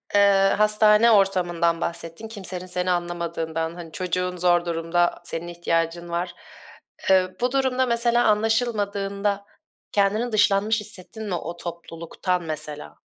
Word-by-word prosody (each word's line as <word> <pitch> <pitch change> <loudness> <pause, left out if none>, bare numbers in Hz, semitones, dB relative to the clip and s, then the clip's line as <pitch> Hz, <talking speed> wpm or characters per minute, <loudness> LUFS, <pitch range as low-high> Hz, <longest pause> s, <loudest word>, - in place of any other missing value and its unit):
eee, 195 -1 +5
hastane 215 +2 +5
ortamından 175 -4 +2
bahsettin 170 +5 -4
kimsenin 190 -4 -2
seni 180 0 -1
anlamadığından, 170 -2 -3
hani, 170 -2 -9
çocuğun 180 0 -2
zor 175 0 +2
durumda, 170 +1 0
senin 170 0 -2
ihtiyacın 170 0 -2
var. 175 +1 -3 0.8
Eee, 185 -1 +3
bu 250 0 +1
durumda, 260 -1 +1
mesela, 235 0 +2
anlaşılmadığında 205 -2 0 0.5
kendini 210 +4 +1
dışlanmış 210 +1 +2
hissettin 210 +3 -6
mi 180 - -1
o 170 0 -6
topluluktan 170 +1 -4
mesela? 150 - -5
180 Hz, 120 wpm, -23 LUFS, 170-210 Hz, 0.8 s, eee